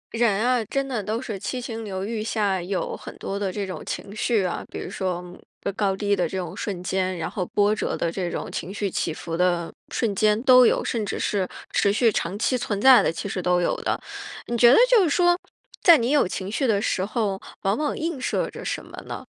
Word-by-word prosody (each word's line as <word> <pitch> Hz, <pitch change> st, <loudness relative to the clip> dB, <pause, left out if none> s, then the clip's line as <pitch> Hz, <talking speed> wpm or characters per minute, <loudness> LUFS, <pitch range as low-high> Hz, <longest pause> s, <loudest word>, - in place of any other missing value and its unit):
人 225 Hz, -1 st, +2 dB
啊， 250 Hz, -2 st, +2 dB
真 275 Hz, +6 st, -2 dB
的 245 Hz, -5 st, -2 dB
都 215 Hz, +4 st, -2 dB
是 225 Hz, -6 st, -5 dB
七 255 Hz, +6 st, -3 dB
情 230 Hz, -2 st, -5 dB
六 190 Hz, -2 st, -4 dB
欲 220 Hz, 0 st, -3 dB
下 205 Hz, -4 st, 0 dB
有 185 Hz, +2 st, -3 dB
很 -, -, -10 dB
多 200 Hz, +1 st, -4 dB
的 200 Hz, -2 st, -1 dB
这 200 Hz, +1 st, -3 dB
种 185 Hz, -, -6 dB
情 200 Hz, -, -6 dB
绪 215 Hz, -2 st, +1 dB
啊。 180 Hz, -, -2 dB
比 -, -, -6 dB
如 -, -, -6 dB
说 180 Hz, -2 st, -3 dB, 0.5 s
高 200 Hz, -2 st, +1 dB
低 205 Hz, 0 st, +1 dB
的 175 Hz, -4 st, 0 dB
这 190 Hz, -, -4 dB
种 180 Hz, -2 st, -4 dB
瞬 185 Hz, -4 st, -4 dB
间， 185 Hz, 0 st, -1 dB
然 160 Hz, -, -3 dB
后 185 Hz, -, -2 dB
波 205 Hz, +1 st, +2 dB
折 -, -, -2 dB
的 170 Hz, -, -1 dB
这 180 Hz, 0 st, -3 dB
种 -, -, -4 dB
情 185 Hz, -, -5 dB
绪 200 Hz, -1 st, -2 dB
起 170 Hz, -, -1 dB
伏 165 Hz, +1 st, -5 dB
的 175 Hz, -1 st, +1 dB, 0.2 s
瞬 225 Hz, -4 st, 0 dB
间 210 Hz, +1 st, +3 dB
都 255 Hz, -2 st, +8 dB
有， -, -, +1 dB
甚 230 Hz, -3 st, -1 dB
至 205 Hz, -, -3 dB
是 195 Hz, -3 st, 0 dB, 0.2 s
持 200 Hz, -, +3 dB
续 225 Hz, +2 st, +3 dB
长 185 Hz, 0 st, -2 dB
期 245 Hz, +4 st, +1 dB
存 205 Hz, -4 st, -2 dB
在 260 Hz, +3 st, +8 dB
的 -, -, +1 dB
其 165 Hz, -, -5 dB
实 190 Hz, -2 st, -3 dB
都 180 Hz, 0 st, +2 dB
有 175 Hz, -, +1 dB
的。 -, -, -1 dB, 0.5 s
你 240 Hz, -, -3 dB
觉 235 Hz, 0 st, +7 dB
得 -, -, +7 dB
就 -, -, +6 dB
是 340 Hz, -, +2 dB
说， 350 Hz, +3 st, +4 dB, 0.5 s
在 340 Hz, -3 st, +8 dB
你 240 Hz, 0 st, 0 dB
有 290 Hz, -9 st, +4 dB
情 190 Hz, +1 st, -5 dB
绪 265 Hz, +5 st, 0 dB
的 205 Hz, -3 st, +3 dB
时 190 Hz, -, 0 dB
候， 205 Hz, -2 st, -1 dB, 0.2 s
往 195 Hz, +1 st, +2 dB
往 300 Hz, +2 st, -2 dB
映 320 Hz, -4 st, -3 dB
射 -, -, 0 dB
着 -, -, -9 dB
什 -, -, -3 dB
么 -, -, -12 dB
呢？ -, -, -6 dB
205 Hz, 255 characters per minute, -24 LUFS, 185-235 Hz, 0.5 s, 都